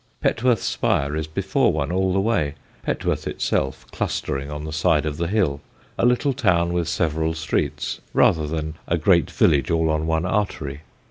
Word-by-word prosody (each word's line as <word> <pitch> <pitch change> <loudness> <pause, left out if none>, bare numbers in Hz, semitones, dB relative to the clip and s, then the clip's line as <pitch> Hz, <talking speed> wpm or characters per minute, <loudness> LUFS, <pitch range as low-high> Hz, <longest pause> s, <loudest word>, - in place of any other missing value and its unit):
Petworth's 120 -1 +1
spire 70 +2 0
is 80 0 -2
before 80 - +1
one 75 0 -2
all 95 +1 +1
the 95 - +2
way, 90 -9 0 0.3
Petworth - - -2
itself 65 -1 -1
clustering 70 +1 -2
on 75 +1 -5
the 80 - -5
side 80 -1 +2
of 75 -1 -3
the 85 +1 -1
hill, 85 -8 0 0.3
a 120 - +2
little 125 +3 +2
town 85 -7 +2
with 85 -2 0
several 80 0 0
streets 80 0 -2
rather 80 -2 +3
than 80 0 -3
a 85 - +1
great 85 0 +3
village 70 -4 +3
all 80 -1 +2
on 80 0 -1
one 80 +1 +1
artery. 90 -8 -2
80 Hz, 175 wpm, -23 LUFS, 75-90 Hz, 0.3 s, rather